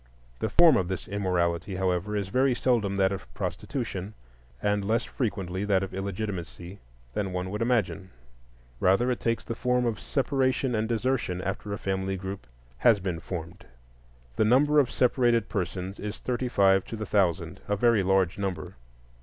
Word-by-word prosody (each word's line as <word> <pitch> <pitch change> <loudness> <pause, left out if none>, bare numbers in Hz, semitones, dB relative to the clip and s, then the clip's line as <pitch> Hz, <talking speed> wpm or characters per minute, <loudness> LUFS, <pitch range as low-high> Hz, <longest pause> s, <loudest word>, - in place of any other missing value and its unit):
The 110 - -1
form 165 +5 +6
of 90 - 0
this 95 0 -4
immorality, 90 -2 -1
however, 95 +2 0
is 100 -2 -2
very 130 +3 +2
seldom 110 -5 +1
that 95 -1 +3
of 95 -11 -6
prostitution, 105 -5 -4 0.4
and 105 +4 0
less 110 +4 +1
frequently 100 -6 -3
that 100 -2 +2
of 95 - -6
illegitimacy 95 -2 -5 0.3
than 95 +2 -2
one 90 0 -3
would 105 +2 -3
imagine. 110 -5 0 0.7
Rather, 100 +7 +3
it 125 - -2
takes 115 -1 -1
the - - -4
form 125 +1 +1
of 115 -4 -1
separation 135 -2 0
and 110 0 0
desertion 115 -5 0
after 100 +2 -4
a 100 - -2
family 95 0 -2
group 95 -7 -6 0.3
has 110 - +5
been 90 -3 -3
formed. 85 +1 -7 0.7
The - - +4
number 145 +6 +5
of 135 -4 +3
separated 120 -3 +2
persons 95 -1 -3
is 105 -1 -5
thirty 125 +2 -2
five 95 -4 +4
to - - -6
the 110 -1 -4
thousand,—a 95 0 0
very 115 0 +3
large 95 -1 +2
number. 90 -9 -4
100 Hz, 160 wpm, -27 LUFS, 95-115 Hz, 0.7 s, form